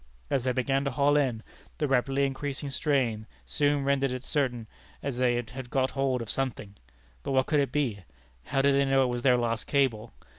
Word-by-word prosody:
As 130 -2 +1
they 130 - +2
began 135 +2 0
to - - +1
haul 140 +2 +2
in, 125 -6 +1 0.3
the 150 - 0
rapidly 135 +1 +2
increasing 140 +1 -4
strain 125 -7 0 0.2
soon 145 -1 +1
rendered 135 0 +1
it 125 0 -5
certain 125 -7 -1 0.4
that 140 - -3
they 125 0 +1
had 120 +2 -5
got 130 0 +1
hold 135 -3 0
of 110 - -10
something. 125 -7 -3 0.5
But 140 - -3
what 130 0 +3
could 150 - +2
it 140 - 0
be? 130 -9 -1 0.5
How 135 -1 0
did 140 0 +4
they 140 0 +3
know 135 0 +3
it 125 - 0
was 120 - -3
their 125 -1 +4
lost 115 -1 -2
cable? 120 -6 +1
135 Hz, 200 wpm, -28 LUFS, 120-140 Hz, 0.5 s, did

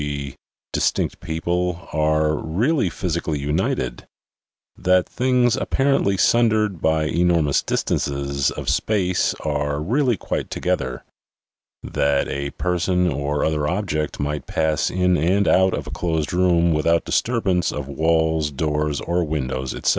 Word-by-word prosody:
g., 70 -2 -4 0.4
dis - - +2
tinct - - -3
people, 90 +2 -2
are 75 0 +2
really 105 - 0
physically 85 -2 -2
united; 75 -3 -2 0.7
that 90 0 +2
things 125 -2 +2
ap - - -4
parently 135 -8 +2
sundered 110 -6 +2
by 80 -1 +2
enormous 85 -2 +2
distances 70 0 -1
of - - -6
space 90 -5 +1
are 75 -1 -1
really 120 - +1
quite - - -3
together; 65 -1 -2 0.8
that 70 -1 0
a 70 0 -3
person 90 +1 0
or 70 +1 -1
other 75 -2 0
object 80 -4 -2
might 75 +1 -3
pass 80 -2 0
in 90 -1 +2
and 95 +6 +2
out 95 0 +4
of - - -5
a - - -8
closed 80 -3 -2
room 85 -2 +3
without 85 +2 +2
disturbance 100 -8 +1
of 75 -2 -5
walls, 80 +1 +1
doors 75 0 -1
or 85 +1 0
windows, 65 -4 -3
etc. - - 0
80 Hz, 135 wpm, -22 LUFS, 75-90 Hz, 0.8 s, out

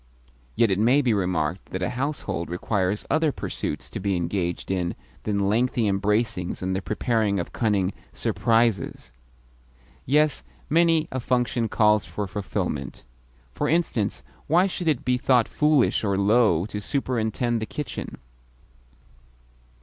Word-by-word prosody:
Yet 115 -2 +3
it 95 - +1
may 125 +7 +4
be 120 -3 +2
remarked 90 -3 -1
that 95 0 -4
a 90 - -1
household 125 - -3
requires 95 +2 -1
other 160 -1 +3
pursuits - - -4
to - - -5
be 100 0 0
engaged 85 +1 -2
in 90 -2 -1 0.3
than 100 -2 0
lengthy 120 +3 +1
embracings 100 -2 0
and 95 0 -1
the 95 - -1
preparing 110 -1 0
of 85 - -5
cunning 100 -5 +1 0.2
"surprises." 115 - 0 1.0
Yes, 150 +3 +3 0.3
many 165 -1 +4
a 130 - -2
function 125 -2 0
calls 105 -1 +3
for 105 - -4
fulfilment. 95 +1 -4 0.5
For 145 - -1
instance, 160 - 0 0.2
why 175 +5 +4
should 180 -3 -3
it 150 -6 +1
be 125 0 +2
thought 125 -3 +3
foolish 150 -6 +2
or 100 -2 +1
low 100 -4 +3
to 105 0 -5
superintend 120 -2 -1
the 110 - -3
kitchen? 150 - -6
110 Hz, 135 wpm, -25 LUFS, 95-125 Hz, 1.0 s, may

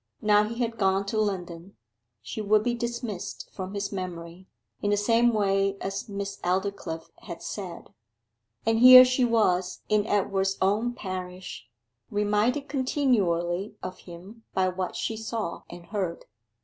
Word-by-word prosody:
Now 210 0 +5
he 225 +2 -5
had 230 -1 -2
gone 195 0 +2
to 215 +2 0
London: 180 -3 -4 0.5
she 215 - -5
would 210 0 +3
be 240 +1 0
dismissed 235 -5 -5
from 190 +1 -6
his 200 0 -3
memory, 180 -1 -6 0.3
in 205 - 0
the 205 - +2
same 230 +3 +3
way 195 -2 +1
as 195 +3 -4
Miss 200 0 -5
Aldclyffe 180 -3 -2
had 170 -1 -9
said. 185 -5 -7 0.7
And 225 0 +2
here 255 +1 +11
she 255 0 +1
was 185 -6 +1
in 210 0 +2
Edward's 195 -1 0
own 210 +6 +1
parish, 185 -2 -7 0.4
reminded 210 +6 +1
continually 205 - 0
of 185 - -6
him 185 +6 -12
by 185 -1 +2
what 185 0 -4
she 225 - -2
saw 220 -4 -4
and 175 0 -10
heard. 190 -5 -3
200 Hz, 145 wpm, -27 LUFS, 185-225 Hz, 0.7 s, here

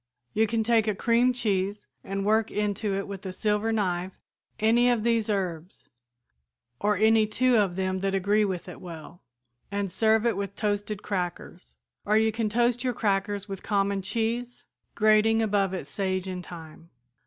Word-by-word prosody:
You 220 +1 +2
can 225 0 0
take 225 -1 +2
a 210 - +1
cream 235 +4 +3
cheese 205 -4 -1 0.2
and 195 0 -3
work 220 +1 +2
into 210 0 -1
it 195 - -3
with 195 -1 -7
a 190 - -4
silver 210 +3 0
knife 185 -4 -1 0.5
any 235 +3 +4
of 235 -3 +1
these 230 -2 +1
herbs, 180 -4 -3 0.9
or 210 -1 +1
any 220 +1 +4
two 250 +3 +2
of 195 -4 +1
them 185 0 -1
that 195 0 -1
agree 205 +3 +2
with 190 -4 -3
it 180 - -10
well, 170 0 -10 0.5
and 200 -2 -2
serve 220 +3 +2
it 230 -3 +2
with 200 0 -4
toasted 205 -1 -2
crackers, 180 -2 -5 0.3
or 210 +1 +2
you 220 0 +3
can 220 0 -1
toast 240 +2 +1
your 250 -1 0
crackers 205 0 -1
with 195 -2 -6
common 200 -1 0
cheese, 230 +4 -3 0.3
grating 215 +1 +4
above 205 -3 +1
it 185 -6 -4
sage 185 +4 -2
and 180 -1 -5
thyme." 165 -1 -11
205 Hz, 170 wpm, -27 LUFS, 190-220 Hz, 0.9 s, any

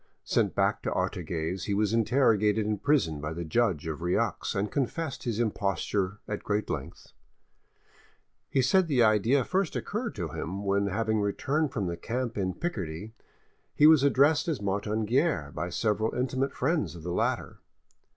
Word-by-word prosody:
Sent - - +1
back - - +1
to - - -2
Artigues, 85 +1 -2
he 100 - -1
was 105 +1 +1
interrogated 110 -3 +3
in 105 -1 -1
prison 80 - +1
by 75 +1 -3
the 85 +1 -5
judge 90 -3 +1
of 80 0 -4
Rieux, 90 +1 -1
and 100 +2 -1
confessed 140 +2 -2
his 115 -2 -1
imposture 100 -2 -1
at 105 - -4
great 105 0 -1
length. - - -7 1.4
He 135 - +2
said 185 +7 +3
the 130 -6 +3
idea 110 +5 +3
first 190 -2 0
occurred - - -3
to - - -3
him 95 +4 -5
when, 100 +1 +1
having 110 +2 0
returned 135 +9 0
from 105 -8 -2
the 85 -1 -3
camp 120 +5 -3
in 95 -3 -1
Picardy, 105 - -4 0.6
he 150 - +5
was 155 -2 +8
addressed 140 +3 +3
as 160 -6 -1
Martin 105 +2 -1
Guerre 125 - +1
by 85 +3 -3
several 110 +3 0
intimate 130 +2 -1
friends 150 - 0
of 85 - -10
the 90 +1 -3
latter. - - -1
110 Hz, 165 wpm, -28 LUFS, 95-130 Hz, 1.4 s, was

